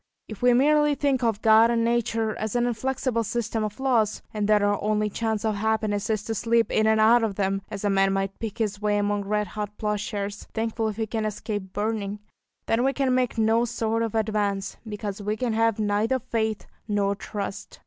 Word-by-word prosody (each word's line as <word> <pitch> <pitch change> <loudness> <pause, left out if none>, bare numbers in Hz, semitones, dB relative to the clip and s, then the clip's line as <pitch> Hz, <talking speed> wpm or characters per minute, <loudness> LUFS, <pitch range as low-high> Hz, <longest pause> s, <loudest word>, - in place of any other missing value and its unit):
If 215 - -9
we 245 0 +5
merely 295 +2 +4
think 275 -3 0
of 225 -3 0
God 225 +1 +6
and 230 -1 +1
nature 230 -2 0
as 220 +1 -3
an 240 0 +2
inflexible 245 0 -1
system 225 0 -2
of 210 +3 -4
laws, 235 -6 +1
and 210 -1 -1
that 210 -1 +4
our 205 0 +1
only 210 0 0
chance 220 0 -2
of 215 -2 0
happiness 215 -1 0
is 215 -2 0
to 225 - -3
slip 230 +1 +1
in 215 - +2
and 220 0 +3
out 225 +2 +5
of 210 -3 -1
them, 195 0 0
as 210 -1 -6
a - - +3
man 195 0 +3
might 195 0 -2
pick 220 -3 -5
his 210 -2 -2
way 210 0 +1
among 205 0 0
red 210 +1 -1
hot 210 -1 -5
ploughshares, 210 -1 -3
thankful 225 0 -1
if 215 - -3
he 225 - 0
can 220 0 -3
escape 210 -2 -4
burning, 210 -1 -2 0.5
then 225 +2 +1
we 270 +1 +2
can 270 -2 +1
make 250 -2 0
no 225 +1 +3
sort 225 -1 -1
of 225 -1 -2
advance, 205 -3 -1
because 210 -1 -5
we 210 +1 -2
can 240 -1 -1
have 225 -1 +2
neither 215 +4 +1
faith 220 -4 -2 0.2
nor 200 -2 +1
trust. 200 -1 -6
220 Hz, 210 wpm, -25 LUFS, 205-230 Hz, 0.5 s, God